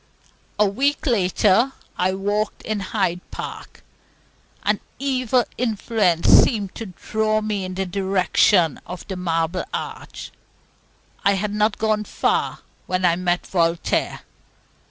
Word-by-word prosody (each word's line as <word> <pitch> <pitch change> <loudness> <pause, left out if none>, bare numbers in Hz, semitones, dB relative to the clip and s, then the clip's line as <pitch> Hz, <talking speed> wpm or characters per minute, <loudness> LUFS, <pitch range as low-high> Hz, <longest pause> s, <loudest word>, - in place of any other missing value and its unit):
A 210 - +4
week 275 +10 0
later, 220 - +3 0.2
I 185 +1 +1
walked 205 +2 -2
in 215 -1 -2
Hyde 190 -3 -1
Park. - - -8 0.8
An - - +1 0.2
evil 255 -3 +1
influence 215 -7 +1
seemed 205 -5 +5
to 225 - -6
draw 215 +4 -1
me 210 -2 -2
in 185 0 -5
the 190 0 -1
direction 185 -3 +2
of 180 - -8
the 190 - -3
Marble 170 0 -1
Arch. - - -6 0.9
I 200 - +4
had 205 +1 -2
not 210 0 +1
gone 215 -1 0
far, - - 0 0.3
when 185 0 0
I 170 -1 +4
met 175 0 0
Voltaire. 170 -2 0
200 Hz, 125 wpm, -22 LUFS, 180-215 Hz, 0.9 s, seemed